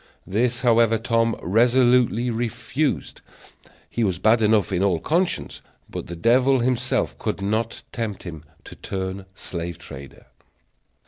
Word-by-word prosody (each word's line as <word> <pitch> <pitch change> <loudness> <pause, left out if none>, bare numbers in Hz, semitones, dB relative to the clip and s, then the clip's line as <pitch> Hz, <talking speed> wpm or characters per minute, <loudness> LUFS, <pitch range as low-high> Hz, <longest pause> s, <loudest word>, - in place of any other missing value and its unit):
This, 120 +5 0
however, 115 -2 +4
Tom 115 0 +1
resolutely 120 +3 +3
refused; 120 +5 -2 0.7
he 120 - -2
was 95 -5 0
bad 110 +5 +3
enough 105 -2 +3
in 90 -1 0
all 95 -4 +2
conscience, 170 - -1 0.3
but - - -6
the 85 - -6
devil 125 +8 +4
himself 125 0 0
could - - -2
not 110 +3 -2
tempt 110 -5 -4
him 80 -4 -8 0.2
to - - -11
turn 95 0 -5
slave 85 -3 -6
trader. 70 0 -11
115 Hz, 130 wpm, -23 LUFS, 95-120 Hz, 0.7 s, however